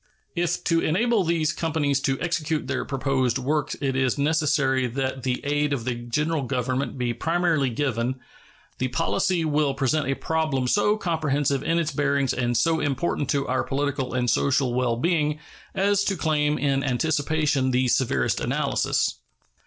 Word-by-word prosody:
If 175 0 -1
to 165 -1 +2
enable 215 +6 +2
these 160 -2 +1
companies 145 -4 0
to 135 0 0
execute 160 -3 -1
their - - -2
proposed 135 -3 0
works 145 +3 -1
it 135 -2 -1
is 130 -1 +1
necessary 140 -3 +2
that 130 +2 -3
the 125 0 -1
aid 145 0 +1
of 120 -5 -3
the 130 - 0
General 145 +7 -1
Government 130 +1 -2
be 120 -1 -1
primarily 160 +1 +1
given, 125 0 -1 0.6
the 130 - 0
policy 165 +5 0
will 150 -2 +1
present 140 +2 0
a 135 - +1
problem 155 -6 -1
so 210 +8 +2
comprehensive 150 -7 0
in 165 - 0
its 165 -2 0
bearings 140 -2 +1
and 120 -1 0
so 165 -1 +2
important 140 0 -1
to 140 -1 0
our 130 - +1
political 140 -2 -2
and 125 -1 0
social 130 0 +2
well 125 -1 +1
being 150 +2 +1 0.4
as 200 +1 +2
to 195 - 0
claim 150 -2 +1
in 135 -1 0
anticipation 145 0 +1
the 130 0 +2
severest 115 - +1
analysis. - - 0
140 Hz, 160 wpm, -24 LUFS, 130-160 Hz, 0.6 s, to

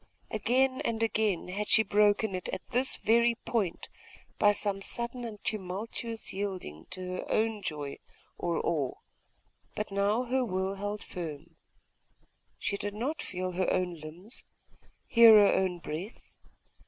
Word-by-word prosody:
Again 260 +5 +2
and 225 -1 0
again 210 -5 0
had 205 +3 -3
she 220 - +6
broken 210 0 +3
it 185 -1 -4
at - - -5
this 255 +2 +3
very 235 +2 +3
point, 210 -7 -2 0.5
by 205 - +6
some 200 -1 -1
sudden 240 +4 -3
and 225 -3 -6
tumultuous 215 +3 -4
yielding 185 - -5
to 185 - -6 0.2
her - - -5
own 220 -1 +1
joy 145 -5 -4 0.4
or 170 -1 -1
awe; 150 -6 0 0.8
but 210 -1 -3
now 200 +4 +2
her 255 +1 +1
will 190 -3 -1
held 205 +1 -4
firm.... 165 -2 -7 1.0
She 200 - -2
did 205 0 -4
not 285 +8 -2
feel 185 0 -3
her 185 +1 0
own 180 -1 +1
limbs, 170 - -9 0.6
hear 230 -2 +8
her 205 -1 +7
own 185 -2 +1
breath.... 175 +6 -7
205 Hz, 140 wpm, -30 LUFS, 185-225 Hz, 1.0 s, hear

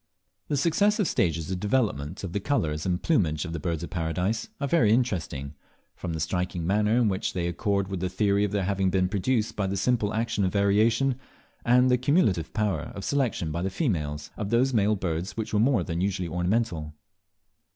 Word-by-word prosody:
The 145 - 0
successive 200 - +2
stages 80 -1 0
of 95 - -2
development 100 - -1
of 90 -3 -5
the 100 - 0
colours 80 - -1
and 90 -1 -1
plumage 85 - +1
of 85 - -5
the 85 - -3
Birds 85 +1 -2
of - - -7
Paradise 90 - -1
are 140 - -1
very 125 -8 +3
interesting, 85 - -1 0.4
from 85 -3 -5
the 80 - -3
striking 90 +1 -2
manner 105 +4 +2
in 120 -2 +3
which 95 -2 -1
they 90 -2 -2
accord 100 +2 0
with 95 -1 -4
the 90 +1 -1
theory 100 +1 +1
of 105 - 0
their 100 -2 0
having 95 0 +1
been 95 0 +2
produced 110 +3 0
by 100 -2 -1
the 100 +1 -2
simple 105 0 +1
action 110 -2 0
of 90 - 0
variation, 110 +6 +2 0.4
and 125 +2 +4
the 125 - +3
cumulative 125 - +2
power 105 -3 -1
of 100 - -6
selection 125 - 0
by 85 +3 -2
the 95 - -1
females, 75 - -2
of 105 -3 -3
those 125 +4 +2
male 105 -1 +3
birds 90 0 -3
which 110 -1 -4
were 105 - +3
more 115 -4 +3
than 85 +1 -3
usually 95 -2 -1
ornamental. 90 -3 -1
100 Hz, 200 wpm, -26 LUFS, 85-115 Hz, 0.4 s, and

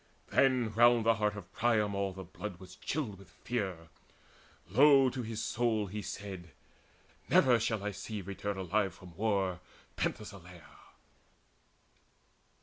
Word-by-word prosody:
Then 125 -5 +3
round 120 0 +5
the 115 - +6
heart 105 -2 0
of 95 -2 -10
Priam 110 -3 +2
all 100 0 -1
the 95 0 -8
blood 95 +1 -7
Was 95 -1 -12
chilled 110 -11 -3
with 100 - -15
fear. 95 -9 -4 0.8
Low 135 +5 +6
to 125 - -4
his 110 -1 -4
soul 115 -3 0
he 105 +2 -5
said: 95 -5 -7 0.8
"Ne'er 125 -3 +5
shall 110 -2 -1
I 105 - -1
see 105 +2 -6
return 100 +1 -4
alive 95 +2 0
from 90 -3 -14
war 100 -3 0 0.4
Penthesileia!" 90 -5 -5
105 Hz, 135 wpm, -32 LUFS, 95-115 Hz, 0.8 s, the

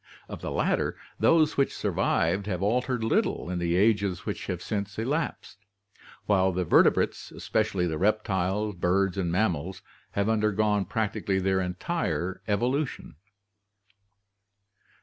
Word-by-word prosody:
Of - - -8
the - - -4
latter, - - 0 0.2
those 160 -2 +4
which 140 - +1
survived 100 +1 0
have 95 -2 -2
altered 125 +3 0
little 110 -5 0
in 90 - -2
the 85 0 0
ages 100 -2 +2
which - - -4
have - - -3
since 100 -1 -4
elapsed, 130 - -3 0.7
while 95 -2 +3
the 90 0 -1
vertebrates, - - +3
especially 100 -5 -1
the 80 -3 -2
reptiles, 105 0 0
birds, 90 +1 +1
and 90 -4 -1
mammals, 95 -2 -1 0.3
have 100 0 0
undergone 105 -2 +1
practically 105 -3 -1
their 95 0 +1
entire 90 - -2
evolution. 125 +7 -1
100 Hz, 125 wpm, -27 LUFS, 95-110 Hz, 0.7 s, those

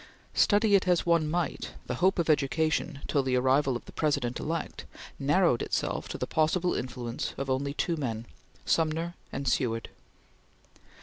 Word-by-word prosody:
Study 205 0 +4
it 195 -2 +4
as 180 -2 +3
one 170 -3 +3
might, 175 +1 -2
the - - -3
hope 190 +2 +4
of 170 - +1
education, 155 0 +1
till 145 - +2
the 130 -1 0
arrival 130 +1 +3
of 120 - -6
the - - -11
President 140 -6 0
elect, 165 +2 -4 0.3
narrowed 145 -2 +3
itself - - -2
to - - -4
the - - -2
possible 165 +3 +1
influence 120 -2 -4
of 135 0 -2
only 140 +2 -1
two 170 - 0
men 115 -6 -3 0.4
Sumner 165 +1 +1 0.2
and 140 - -4
Seward. 115 -3 0
150 Hz, 160 wpm, -29 LUFS, 130-170 Hz, 0.4 s, Study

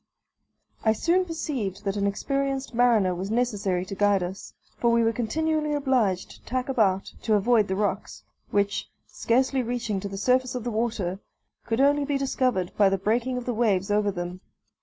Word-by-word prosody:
I 220 - +4
soon 345 - +2
perceived 255 - -4
that 195 0 -1
an 200 -1 0
experienced 275 +6 -2
mariner 230 -6 +3
was 185 +3 -4
necessary 205 -6 0
to 190 - -7
guide 200 -1 +2
us, 185 +2 -7 0.2
for 235 - +3
we 235 0 +3
were 225 0 +2
continually 305 +6 -1
obliged 255 -10 +1
to - - -15
tack 255 +2 -3
about, 200 -7 +1
to 220 - +2
avoid 215 0 +3
the 190 - -1
rocks, 200 0 -2 0.3
which, 200 0 0 0.2
scarcely 260 +3 +1
reaching 235 -4 -2
to 200 +1 -5
the 195 - -6
surface 255 +4 +1
of 250 - -3
the 240 - -3
water, 215 -5 -2 0.5
could 225 +1 0
only 285 +1 +4
be 280 0 0
discovered 255 -9 0
by 200 -2 +5
the 195 - +1
breaking 235 +6 0
of 250 - -5
the 245 - -1
waves 205 -4 +1
over 205 0 +2
them. 180 -1 -5
225 Hz, 180 wpm, -26 LUFS, 195-255 Hz, 0.5 s, by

